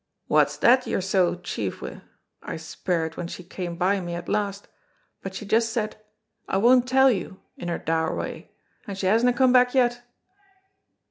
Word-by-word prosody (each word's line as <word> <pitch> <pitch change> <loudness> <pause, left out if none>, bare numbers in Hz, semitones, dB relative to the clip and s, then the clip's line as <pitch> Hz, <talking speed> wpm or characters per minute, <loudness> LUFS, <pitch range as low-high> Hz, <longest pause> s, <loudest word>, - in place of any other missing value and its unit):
'Wha's - - +3
that 255 +1 +4
you're - - 0
so 190 -2 +1
chief 110 - -4
wi'?' - - -8 0.4
I - - -6
speired 160 0 -3
when 175 - -4
she 180 - -8
came 175 -1 -6
by 190 +3 +2
me 175 -1 -4
at 175 0 -7
last, 205 -1 -2 0.5
but 195 0 -7
she 210 - -6
just 225 +3 +2
said, 215 -2 -2 0.5
'I - - +1
won't 245 +4 +5
tell 265 +1 +5
you,' 190 -2 -4 0.2
in - - -7
her 170 - -1
dour 160 0 -1
wy, - - -6 0.4
and 200 -2 -5
she 195 - -3
hasna 230 +6 +4
come 255 0 +3
back 250 0 +4
yet." 240 -2 +2
195 Hz, 180 wpm, -25 LUFS, 175-240 Hz, 0.5 s, won't